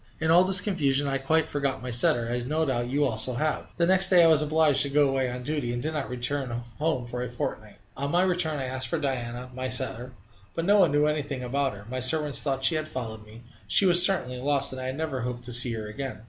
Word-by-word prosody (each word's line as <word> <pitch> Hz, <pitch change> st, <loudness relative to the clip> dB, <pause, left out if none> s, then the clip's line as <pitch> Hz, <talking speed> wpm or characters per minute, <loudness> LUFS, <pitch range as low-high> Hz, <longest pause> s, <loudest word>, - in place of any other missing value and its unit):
In 160 Hz, 0 st, 0 dB
all 175 Hz, +2 st, +6 dB
this 185 Hz, 0 st, +6 dB
confusion 145 Hz, -8 st, 0 dB
I 135 Hz, 0 st, -1 dB
quite 160 Hz, +4 st, +1 dB
forgot 140 Hz, -4 st, -3 dB
my 125 Hz, -, -5 dB
setter, 120 Hz, 0 st, +2 dB
as 120 Hz, +1 st, -3 dB
no 155 Hz, +5 st, -1 dB
doubt 120 Hz, -4 st, -2 dB
you 145 Hz, +3 st, +1 dB
also 120 Hz, 0 st, -2 dB
have. 155 Hz, +4 st, -2 dB
The 170 Hz, -, +2 dB
next 190 Hz, +2 st, +5 dB
day 180 Hz, -2 st, +6 dB
I -, -, +6 dB
was 160 Hz, -2 st, +4 dB
obliged 150 Hz, -2 st, +2 dB
to 140 Hz, -, +1 dB
go 145 Hz, 0 st, +3 dB
away 135 Hz, -1 st, -1 dB
on 125 Hz, 0 st, -6 dB
duty, 145 Hz, -3 st, -3 dB
and 120 Hz, -, -3 dB
did 155 Hz, +1 st, -3 dB
not 150 Hz, -3 st, -4 dB
return 130 Hz, +2 st, -3 dB, 0.3 s
home 150 Hz, -5 st, -1 dB
for 125 Hz, +1 st, -6 dB
a 125 Hz, -, -4 dB
fortnight. 110 Hz, -3 st, -6 dB, 0.2 s
On 140 Hz, +1 st, -3 dB
my 175 Hz, +4 st, +2 dB
return 175 Hz, -4 st, 0 dB
I 135 Hz, -, -3 dB
asked 130 Hz, 0 st, -3 dB
for 165 Hz, -, -2 dB
Diana, 125 Hz, -3 st, -4 dB
my 130 Hz, 0 st, -4 dB
setter. 125 Hz, -1 st, -3 dB, 0.4 s
No 200 Hz, +5 st, +3 dB
one 175 Hz, -6 st, +4 dB
knew 145 Hz, +1 st, +2 dB
anything 145 Hz, -3 st, -2 dB
about 135 Hz, +2 st, -1 dB
her. 100 Hz, 0 st, -12 dB
My 130 Hz, +2 st, -4 dB
servants 150 Hz, +3 st, +3 dB
thought 135 Hz, -2 st, -2 dB
she -, -, +3 dB
had 155 Hz, -1 st, -2 dB
followed 110 Hz, -6 st, -7 dB
me. 110 Hz, +2 st, -14 dB, 0.2 s
She 200 Hz, -, +3 dB
was 175 Hz, -1 st, +7 dB
certainly 125 Hz, -10 st, +1 dB
lost, 140 Hz, +1 st, 0 dB
and 130 Hz, 0 st, -7 dB
I 130 Hz, 0 st, -3 dB
never 135 Hz, -2 st, -4 dB
hoped 120 Hz, 0 st, -5 dB
to 125 Hz, 0 st, -4 dB
see 120 Hz, 0 st, +3 dB
her 110 Hz, -1 st, -5 dB
again! 130 Hz, +5 st, -6 dB
135 Hz, 250 wpm, -26 LUFS, 125-155 Hz, 0.4 s, was